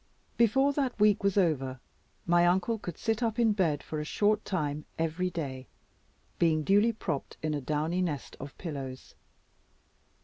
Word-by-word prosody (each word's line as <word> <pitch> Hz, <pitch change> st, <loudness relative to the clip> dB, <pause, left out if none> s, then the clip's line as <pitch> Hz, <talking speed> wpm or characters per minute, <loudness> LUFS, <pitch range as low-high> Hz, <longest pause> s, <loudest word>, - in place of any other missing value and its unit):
Before 270 Hz, +5 st, +3 dB
that 270 Hz, -5 st, -1 dB
week 210 Hz, -1 st, +4 dB
was 200 Hz, 0 st, +1 dB
over, 135 Hz, -8 st, +1 dB, 0.5 s
my 175 Hz, 0 st, +4 dB
uncle 190 Hz, +6 st, +1 dB
could 175 Hz, -5 st, -6 dB
sit 225 Hz, +1 st, -1 dB
up 230 Hz, -1 st, 0 dB
in 230 Hz, -3 st, +4 dB
bed 160 Hz, -8 st, 0 dB
for 155 Hz, -, -4 dB
a -, -, -2 dB
short 210 Hz, +7 st, +1 dB
time 150 Hz, -5 st, -2 dB
every 165 Hz, +3 st, -1 dB
day, 135 Hz, -7 st, -5 dB, 0.7 s
being 160 Hz, -2 st, +3 dB
duly 205 Hz, +7 st, +4 dB
propped 165 Hz, -10 st, -4 dB
in 155 Hz, -1 st, 0 dB
a 145 Hz, -, -2 dB
downy 155 Hz, +6 st, -1 dB
nest 150 Hz, -7 st, -3 dB
of 140 Hz, 0 st, -9 dB
pillows. 135 Hz, -6 st, -6 dB
175 Hz, 160 wpm, -29 LUFS, 150-210 Hz, 0.7 s, week